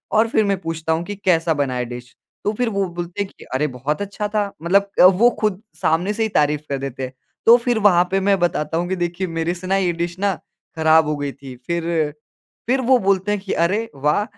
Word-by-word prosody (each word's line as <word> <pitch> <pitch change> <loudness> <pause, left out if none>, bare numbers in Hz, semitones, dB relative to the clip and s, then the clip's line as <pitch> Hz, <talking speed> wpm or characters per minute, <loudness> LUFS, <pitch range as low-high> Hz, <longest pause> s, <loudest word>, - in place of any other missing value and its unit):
और 220 +1 +4
फिर 220 - +2
मैं 200 -1 +1
पूछता 160 0 -2
हूँ 165 +1 -1
कि, 205 - -5
कैसा 170 -4 +2
बना 140 -4 -1
है 125 -1 -1
डिश? 125 +1 -9 0.3
तो 205 - +1
फिर 240 +2 -1
वो 200 -2 0
बोलते 175 +3 -4
हैं 195 - -10
कि - - -13
अरे! 140 +4 +1
बहुत 135 +5 -3
अच्छा 205 +1 -3
था, 205 -1 -1
मतलब 195 +4 +2 0.3
वो 240 +2 +7
खुद 210 -2 0 0.2
सामने 175 +6 +1
से 225 +1 -1
ही 220 - 0
तारीफ़ 150 -5 +1
कर 140 - -1
देते 135 -1 -5
हैं, 130 0 -5 0.3
तो 230 - +9
फिर 240 -1 0
वहाँ 190 -4 +5
पे 195 - +2
मैं 195 0 +2
बताता 165 -2 0
हूँ 175 +1 -1
कि 190 - 0
देखिए 175 +1 -2
मेरे 165 0 -2
से 180 +1 -8
ना 195 +1 +2
ये 185 -2 +1
डिश 170 +1 -3
ना 200 0 +1 0.4
ख़राब 160 0 +4
हो 150 - 0
गई 145 -1 -3
थी। 135 -1 -11
फिर 170 -1 -1 0.8
फिर 260 +2 +2
वो 255 +1 +4
बोलते 195 +1 +1
हैं 205 - 0
कि 195 - -3
अरे 215 +6 -1
वाह! 150 +8 +1
175 Hz, 240 wpm, -20 LUFS, 155-205 Hz, 0.8 s, तो